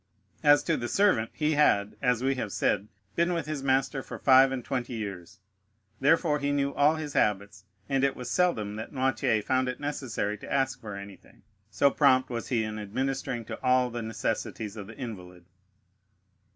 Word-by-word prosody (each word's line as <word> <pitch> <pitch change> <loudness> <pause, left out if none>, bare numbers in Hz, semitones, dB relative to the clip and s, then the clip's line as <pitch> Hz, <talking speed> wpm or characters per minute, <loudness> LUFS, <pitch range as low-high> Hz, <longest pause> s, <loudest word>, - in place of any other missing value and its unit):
As 145 -1 +5
to 165 - 0
the 120 - -3
servant, 125 - +2
he 150 0 0
had, 105 -9 +3
as 125 -2 +1
we 135 +1 +2
have 115 -6 -4
said, 100 - 0 0.3
been 170 +1 +2
with 165 -4 -2
his 155 -2 -4
master 135 +1 +1
for - - -8
five 135 0 +6
and 130 -3 -4
twenty 125 -2 -3
years, 100 -6 -6 0.6
therefore 150 +1 +3
he 145 0 -1
knew 140 -1 0
all 150 +2 +3
his 155 -2 -5
habits, 100 -2 0 0.2
and 135 -1 0
it 140 -1 +2
was 125 - -7
seldom 115 - 0
that 110 - -6
Noirtier 130 -4 0
found 130 +3 +1
it 125 - -5
necessary 125 -8 -3
to - - -10
ask 130 -2 0
for 105 -3 -7
anything, 100 0 -12 0.3
so 125 +7 +3
prompt 130 -3 +3
was 120 -1 -4
he 115 -3 0
in 110 0 -4
administering 120 +2 -3
to - - -7
all 125 -1 +2
the 120 0 -4
necessities 110 -1 -3
of 100 -3 -8
the 110 0 -12
invalid. 90 -7 -8
125 Hz, 185 wpm, -28 LUFS, 110-140 Hz, 0.6 s, five